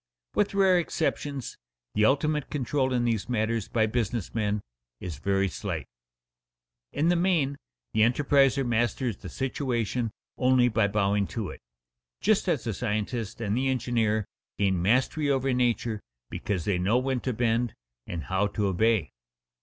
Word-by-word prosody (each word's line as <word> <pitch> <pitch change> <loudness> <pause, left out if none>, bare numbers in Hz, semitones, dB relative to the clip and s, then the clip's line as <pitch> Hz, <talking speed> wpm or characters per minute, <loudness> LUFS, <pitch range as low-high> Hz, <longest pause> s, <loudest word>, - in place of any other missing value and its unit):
With 205 -1 +1
rare 190 -2 +5
exceptions 145 -5 -2 0.3
the 105 - +3
ultimate 150 +3 +1
control 135 -1 0
in 120 -1 +1
these 115 -1 -1
matters 115 -2 0
by 110 -2 +2
business 115 -2 -2
men 105 -2 0 0.4
is 85 -7 -6
very 100 +4 +1
slight. - - -4 1.1
In 160 +4 +1
the 175 - +4
main 170 -6 +2 0.4
the 110 - +2
enterpriser 135 +3 +4
masters 120 -1 0
the - - -9
situation 125 -3 -1 0.3
only 125 -1 +4
by 110 -2 +2
bowing 100 -1 +1
to 110 -5 -4
it, - - -11 0.6
just - - +2
as - - +1
the 115 - -2
scientist 110 +1 -3
and 105 -2 0
the 135 +2 +1
engineer 115 -5 +1 0.3
gain 95 -3 +1
mastery 130 - +2
over 135 -1 +1
nature 120 -3 0 0.3
because 95 -5 -2
they 95 -3 +1
know 100 +7 +2
when 130 0 0
to 130 - -2
bend 115 0 0 0.3
and 85 -2 -4
how 95 +2 +1
to 105 0 -2
obey. 100 -2 +2
120 Hz, 150 wpm, -27 LUFS, 105-130 Hz, 1.1 s, rare